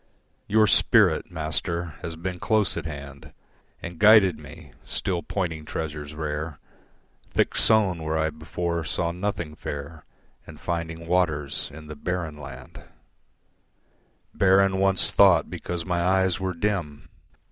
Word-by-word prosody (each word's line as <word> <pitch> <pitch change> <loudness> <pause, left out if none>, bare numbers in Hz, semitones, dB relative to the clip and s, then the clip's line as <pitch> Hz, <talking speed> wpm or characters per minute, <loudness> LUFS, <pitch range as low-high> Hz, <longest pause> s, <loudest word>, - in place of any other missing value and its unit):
Your 110 +1 +4
Spirit, - - +4
Master, 85 +1 -3
has 80 0 -5
been 90 +2 -5
close 110 -1 +1
at - - -4
hand 70 -2 -9 0.5
And 85 -1 -7
guided 105 -3 +6
me, 75 0 -12
still 90 -3 -2
pointing 85 -6 -3
treasures 75 -1 -5
rare, 75 0 -4 0.7
Thick - - +1
sown 100 -6 +3
where 80 0 -1
I 80 0 +1
before 85 +2 -3
saw 85 +2 -1
nothing 90 -3 -3
fair 75 +1 -7 0.4
And - - -11
finding 85 -1 -4
waters 80 -6 0
in 75 +2 -11
the 75 0 -8
barren 85 0 -3
land, 65 -2 -10 1.5
Barren 95 0 +4
once 95 -1 +2
thought - - +5
because 85 -1 -4
my 90 -2 0
eyes 95 -2 +2
were 95 -1 -2
dim. 85 -6 -2
85 Hz, 130 wpm, -25 LUFS, 75-90 Hz, 1.5 s, guided